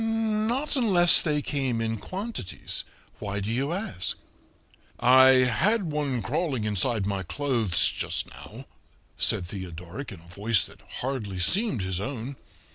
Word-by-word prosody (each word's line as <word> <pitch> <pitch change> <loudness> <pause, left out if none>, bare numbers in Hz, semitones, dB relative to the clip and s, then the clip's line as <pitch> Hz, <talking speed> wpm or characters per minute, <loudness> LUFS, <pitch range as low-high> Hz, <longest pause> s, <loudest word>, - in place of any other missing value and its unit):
"Not 225 +5 -1
unless 190 -9 +7
they 150 -3 -1
came 135 -5 -2
in 115 0 -2
quantities. 185 - -6 0.3
Why 100 0 -4
do 100 +2 -3
you 135 +6 -1
ask?" 170 - -3 0.8
"I 130 +1 +6
had 175 - +1
one 140 -6 -2
crawling 135 - -2
inside 105 0 0
my 100 -1 -2
clothes 115 -2 +1
just - - -2
now," - - -12 0.5
said 90 - +1
Theodoric 90 - -8
in - - -10
a 85 - -19
voice 105 0 +1
that - - -15 0.2
hardly 120 -7 -4
seemed 130 - +2
his 95 -1 -2
own. 130 +3 -5
125 Hz, 135 wpm, -26 LUFS, 100-170 Hz, 0.8 s, unless